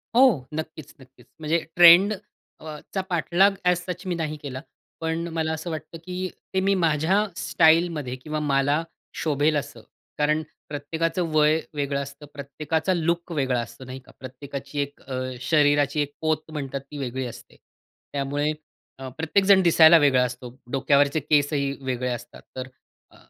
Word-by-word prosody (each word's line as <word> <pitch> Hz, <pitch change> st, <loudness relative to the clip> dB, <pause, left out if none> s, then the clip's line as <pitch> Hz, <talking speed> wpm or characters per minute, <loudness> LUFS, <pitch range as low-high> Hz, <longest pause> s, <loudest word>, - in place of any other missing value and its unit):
हो. 235 Hz, -, +4 dB
नक्कीच, 155 Hz, -1 st, -6 dB
नक्कीच 130 Hz, -2 st, -19 dB
म्हणजे 155 Hz, +2 st, +1 dB, 0.2 s
ट्रेंडचा 175 Hz, -2 st, +3 dB
पाठलाग 180 Hz, +3 st, +3 dB
अ‍ॅज 180 Hz, -1 st, +3 dB
सच 180 Hz, +2 st, -5 dB
मी 175 Hz, -, -1 dB
नाही 155 Hz, -2 st, -3 dB
केला. 130 Hz, -2 st, -6 dB, 0.4 s
पण 165 Hz, +1 st, -2 dB
मला 160 Hz, -1 st, -1 dB
असं 160 Hz, +2 st, -5 dB
वाटतं, 160 Hz, +1 st, -6 dB
की 185 Hz, 0 st, -4 dB, 0.2 s
ते 190 Hz, -, +2 dB
मी 195 Hz, +1 st, +2 dB
माझ्या 170 Hz, +4 st, +2 dB
स्टाईलमध्ये 160 Hz, -5 st, +2 dB
किंवा 155 Hz, +4 st, -5 dB
मला 145 Hz, +2 st, +1 dB, 0.4 s
शोभेल 150 Hz, 0 st, +1 dB
असं. 120 Hz, -5 st, -6 dB, 0.4 s
कारण 150 Hz, +1 st, +2 dB, 0.3 s
प्रत्येकाचं 165 Hz, +4 st, -2 dB
वय 155 Hz, +1 st, +4 dB
वेगळं 140 Hz, -1 st, -1 dB
असतं. 140 Hz, +2 st, -9 dB
प्रत्येकाचा 155 Hz, +5 st, -2 dB
लूक 170 Hz, +1 st, -1 dB
वेगळा 130 Hz, -5 st, 0 dB
असतो 120 Hz, +3 st, -7 dB
नाही 130 Hz, +1 st, -8 dB
का? -, -, -17 dB
प्रत्येकाची 140 Hz, +2 st, -7 dB
एक 140 Hz, 0 st, -5 dB
अ, 130 Hz, -1 st, -5 dB, 0.2 s
शरीराची 145 Hz, 0 st, +2 dB
एक 145 Hz, 0 st, -3 dB
पोत 155 Hz, -1 st, 0 dB
म्हणतात 140 Hz, -2 st, -4 dB
ती 145 Hz, -, -7 dB
वेगळी 130 Hz, -1 st, -3 dB
असते. 120 Hz, -, -11 dB, 0.6 s
त्यामुळे 145 Hz, +2 st, -1 dB, 0.5 s
अ, 135 Hz, -, -6 dB
प्रत्येकजण 190 Hz, +4 st, +4 dB
दिसायला 165 Hz, -1 st, +7 dB
वेगळा 135 Hz, -4 st, +4 dB
असतो. 125 Hz, 0 st, -7 dB, 0.2 s
डोक्यावरचे 140 Hz, +2 st, +2 dB
केसही 145 Hz, -1 st, +1 dB
वेगळे 125 Hz, -1 st, -2 dB
असतात. 120 Hz, -1 st, -7 dB
तर 130 Hz, 0 st, -5 dB, 0.4 s
अ, -, -, -20 dB
150 Hz, 145 wpm, -24 LUFS, 140-165 Hz, 0.6 s, दिसायला